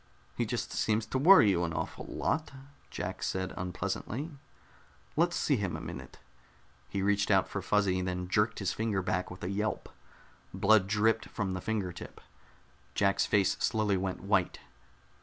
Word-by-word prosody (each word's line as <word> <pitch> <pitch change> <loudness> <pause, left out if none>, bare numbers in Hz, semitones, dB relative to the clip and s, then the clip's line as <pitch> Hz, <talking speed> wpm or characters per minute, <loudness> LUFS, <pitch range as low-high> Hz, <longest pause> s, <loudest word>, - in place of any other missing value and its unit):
"He - - -1
just - - -3
seems 110 0 0
to 130 +4 -2
worry 155 - +8
you 85 -2 +1
an 85 -1 -2
awful - - -4
lot," 155 - -1 0.4
Jack - - -5
said 95 0 -2
unpleasantly. 100 - -4 0.8
"Let's 170 +2 +2
see 140 - +2
him 100 -4 -2
a - - -7
minute." - - -8 0.7
He 95 - -2
reached 100 0 +2
out 95 -2 +4
for 100 - -4
Fuzzy, 95 -1 +1
then 90 0 -3
jerked 105 +4 +1
his 100 -3 -1
finger 110 -4 -1
back 90 0 -1
with 90 - -10
a 90 - -2
yelp. 105 +2 -2 0.7
Blood 100 -1 +4
dripped 110 +2 +1
from 100 -3 -2
the 95 - -4
finger 105 -5 -2
tip. 85 - -10 0.8
Jack's 100 -1 +2
face 100 -3 +3
slowly 110 -3 +1
went 95 0 -2
white. 95 -2 +1
100 Hz, 160 wpm, -31 LUFS, 95-110 Hz, 0.8 s, worry